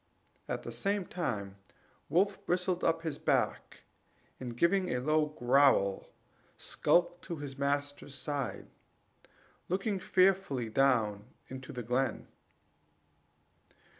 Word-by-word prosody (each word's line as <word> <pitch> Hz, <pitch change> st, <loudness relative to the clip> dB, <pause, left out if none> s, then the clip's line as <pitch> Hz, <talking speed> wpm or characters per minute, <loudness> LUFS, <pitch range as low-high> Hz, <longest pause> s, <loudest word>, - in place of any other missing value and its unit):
at -, -, -3 dB
the -, -, -6 dB
same 200 Hz, -1 st, -1 dB
time 105 Hz, -, -3 dB, 0.5 s
Wolf 195 Hz, +4 st, +2 dB
bristled 180 Hz, 0 st, 0 dB
up 165 Hz, 0 st, +1 dB
his 160 Hz, -4 st, -3 dB
back, -, -, -1 dB, 0.6 s
and 120 Hz, -2 st, -6 dB
giving 185 Hz, +5 st, +3 dB
a 125 Hz, -, 0 dB
low 155 Hz, +3 st, +2 dB
growl, 125 Hz, -8 st, +3 dB, 0.5 s
skulked 175 Hz, 0 st, +1 dB
to 170 Hz, -, -4 dB
his 145 Hz, -3 st, -7 dB
master's 145 Hz, 0 st, -2 dB
side, 140 Hz, -2 st, -3 dB, 1.0 s
looking 195 Hz, +2 st, 0 dB
fearfully 185 Hz, -12 st, +2 dB
down 110 Hz, -5 st, +2 dB, 0.2 s
into 130 Hz, 0 st, -8 dB
the 125 Hz, -, -5 dB
glen. 125 Hz, +2 st, -1 dB
145 Hz, 105 wpm, -32 LUFS, 125-180 Hz, 1.0 s, giving